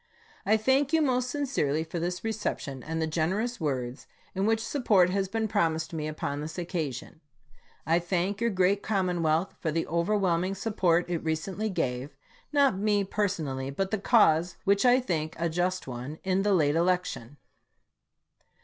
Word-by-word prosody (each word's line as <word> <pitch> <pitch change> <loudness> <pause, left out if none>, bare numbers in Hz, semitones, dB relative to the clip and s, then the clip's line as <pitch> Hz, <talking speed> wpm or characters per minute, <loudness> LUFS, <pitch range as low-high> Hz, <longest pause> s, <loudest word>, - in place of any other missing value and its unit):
I 215 +2 +5
thank 265 +6 +2
you 320 - +4
most 255 -2 +1
sincerely 245 - 0
for 165 +1 -5
this 175 +2 -3
reception, 210 -11 -3
and 160 +5 -4
the 160 - +1
generous 190 +10 -1
words 130 -3 -3 0.3
in 190 +2 0
which 225 0 +1
support 205 -10 +3
has 195 0 0
been 220 +3 -1
promised 160 -4 0
me 155 -2 -3
upon 150 -1 -3
this 155 +3 -6
occasion. 165 -4 -4 0.6
I 165 +2 +3
thank 185 +4 -1
your 235 - +2
great 195 0 +2
commonwealth 180 -4 0
for 160 - -2
the 165 +1 -1
overwhelming 180 +1 +1
support 185 -5 +1
it 175 -2 -2
recently 180 +7 -2
gave, 135 -6 -2 0.4
not 280 -9 +3
me 205 -1 +2
personally, 160 -10 -2
but 190 +7 -2
the 215 - 0
cause 180 -6 +3
which 200 +4 +3
I 245 +1 +6
think 160 -10 -2
a 170 0 0
just 180 +3 -1
one, 130 +4 -6
in 190 0 +1
the 200 -1 +3
late 150 -3 +2
election. 170 -7 -1
180 Hz, 160 wpm, -28 LUFS, 160-205 Hz, 0.6 s, I